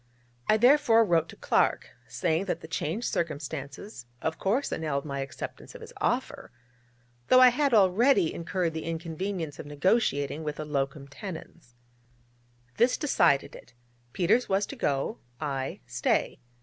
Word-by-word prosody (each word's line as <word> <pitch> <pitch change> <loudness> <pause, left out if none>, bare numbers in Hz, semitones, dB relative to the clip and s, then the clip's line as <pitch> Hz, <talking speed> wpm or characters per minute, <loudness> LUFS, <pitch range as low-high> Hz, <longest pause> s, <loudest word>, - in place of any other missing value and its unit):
I 215 - +4
therefore 240 -2 +5
wrote 165 -4 +2
to - - -10
Clark, - - +1 0.2
saying 170 +1 -1
that 195 - -3
the - - -9
changed 165 +8 -3
circumstances 145 - -4
of 160 +3 -3
course 235 +9 0
annulled 150 -3 -2
my 140 -2 -4
acceptance 135 0 -7
of - - -10
his - - -11
offer, - - -2 0.8
though 255 - +7
I 255 0 +9
had 280 +3 +1
already 210 - +4
incurred 170 0 -2
the 160 - -4
inconvenience 165 0 -4
of - - -7
negotiating 145 -2 0
with 150 -1 -4
a 155 - -3
locum 140 -1 -2
tenens. 160 - -10 1.0
This 245 +2 +3
decided 175 - +2
it: - - -15 0.4
Peters 210 - +2
was 195 +1 +2
to - - -8
go, 145 - -1 0.2
I 135 -3 -3
stay. - - 0
165 Hz, 145 wpm, -28 LUFS, 145-215 Hz, 1.0 s, I